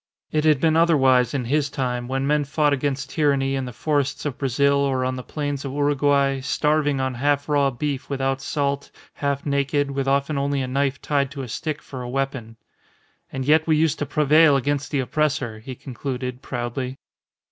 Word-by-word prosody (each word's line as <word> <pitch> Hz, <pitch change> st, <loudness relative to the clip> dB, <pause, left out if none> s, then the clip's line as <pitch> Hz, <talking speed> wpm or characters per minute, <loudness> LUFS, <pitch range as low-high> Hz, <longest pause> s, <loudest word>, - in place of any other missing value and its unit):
It 155 Hz, 0 st, +1 dB
had 155 Hz, -3 st, +4 dB
been 160 Hz, +1 st, +3 dB
otherwise 135 Hz, -6 st, +4 dB
in 130 Hz, -3 st, -1 dB
his 145 Hz, +3 st, +1 dB
time 125 Hz, -3 st, -2 dB
when 135 Hz, +1 st, -1 dB
men 150 Hz, +1 st, +2 dB
fought 145 Hz, +1 st, +1 dB
against 140 Hz, 0 st, -2 dB
tyranny, 140 Hz, -3 st, +1 dB
in 135 Hz, -1 st, -1 dB
the 125 Hz, -, -6 dB
forests 145 Hz, +4 st, -1 dB
of 140 Hz, -4 st, -3 dB
Brazil, 140 Hz, +1 st, +2 dB
or 135 Hz, -2 st, +1 dB
on 130 Hz, 0 st, -1 dB
the 130 Hz, -, -5 dB
plains 145 Hz, +1 st, -4 dB
of 135 Hz, -2 st, -5 dB
Uruguay, 140 Hz, -1 st, +2 dB
starving 145 Hz, +1 st, +1 dB
on 130 Hz, 0 st, -1 dB
half 145 Hz, +3 st, 0 dB
raw 145 Hz, -2 st, +3 dB
beef 135 Hz, +1 st, -4 dB
without 135 Hz, -1 st, -1 dB
salt, 140 Hz, 0 st, -2 dB, 0.2 s
half 140 Hz, -1 st, -2 dB
naked, 140 Hz, 0 st, 0 dB
with 135 Hz, 0 st, -2 dB
often 140 Hz, +1 st, +1 dB
only 140 Hz, -1 st, 0 dB
a -, -, -3 dB
knife 135 Hz, +1 st, 0 dB
tied 140 Hz, -2 st, +1 dB
to 140 Hz, -1 st, -6 dB
a -, -, -6 dB
stick 155 Hz, +6 st, -4 dB
for 130 Hz, -2 st, -8 dB
a 120 Hz, -, -6 dB
weapon. 130 Hz, -4 st, -3 dB, 0.7 s
"And 130 Hz, 0 st, -4 dB
yet 155 Hz, +3 st, +4 dB
we 155 Hz, -1 st, +3 dB
used 160 Hz, -1 st, +1 dB
to 145 Hz, -, -2 dB
prevail 150 Hz, +1 st, +5 dB
against 145 Hz, +2 st, -1 dB
the 140 Hz, -3 st, 0 dB
oppressor," 135 Hz, -5 st, -1 dB
he 130 Hz, +3 st, -8 dB
concluded, 125 Hz, 0 st, -5 dB
proudly. 125 Hz, +1 st, -4 dB
140 Hz, 190 wpm, -23 LUFS, 130-145 Hz, 0.7 s, prevail